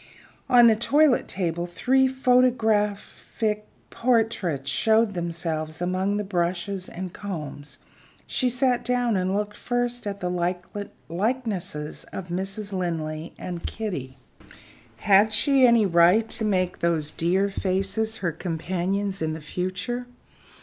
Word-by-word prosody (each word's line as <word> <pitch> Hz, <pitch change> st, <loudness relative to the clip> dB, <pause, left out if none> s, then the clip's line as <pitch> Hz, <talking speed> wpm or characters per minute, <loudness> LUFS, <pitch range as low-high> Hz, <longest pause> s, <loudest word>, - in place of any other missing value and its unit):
On 245 Hz, -2 st, +7 dB
the 225 Hz, -1 st, +6 dB
toilet 280 Hz, +4 st, +3 dB
table 175 Hz, -2 st, -2 dB
three 260 Hz, +9 st, +2 dB
photographic 225 Hz, -4 st, +1 dB, 0.2 s
portraits 220 Hz, -, 0 dB
showed 220 Hz, +8 st, +3 dB
themselves 165 Hz, -3 st, -3 dB
among 185 Hz, +3 st, 0 dB
the 210 Hz, -, -1 dB
brushes 185 Hz, 0 st, -2 dB
and 185 Hz, 0 st, -6 dB
combs. 150 Hz, -7 st, -7 dB, 0.5 s
She 255 Hz, -, 0 dB
sat 250 Hz, 0 st, +2 dB
down, 245 Hz, -2 st, +1 dB
and 185 Hz, +1 st, 0 dB
looked 210 Hz, 0 st, -2 dB
first 245 Hz, -1 st, -1 dB
at 200 Hz, 0 st, -4 dB
the 180 Hz, +2 st, -3 dB, 0.2 s
likenesses 185 Hz, -, -2 dB
of 180 Hz, -2 st, -8 dB
Mrs. 195 Hz, +3 st, -2 dB
Linley 165 Hz, -3 st, -3 dB
and 175 Hz, -2 st, -6 dB
Kitty. 140 Hz, -, -5 dB, 0.8 s
Had 205 Hz, -, +4 dB
she 260 Hz, +4 st, +4 dB
any 235 Hz, -3 st, +5 dB
right 180 Hz, +5 st, +4 dB
to 220 Hz, -, 0 dB
make 185 Hz, -3 st, 0 dB
those 160 Hz, -3 st, 0 dB
dear 185 Hz, +4 st, +1 dB
faces 195 Hz, +4 st, -1 dB
her 175 Hz, -3 st, -1 dB
companions 185 Hz, +4 st, -2 dB
in 160 Hz, 0 st, -1 dB
the 160 Hz, -, -6 dB
future? 185 Hz, +10 st, -4 dB
195 Hz, 120 wpm, -25 LUFS, 175-225 Hz, 0.8 s, On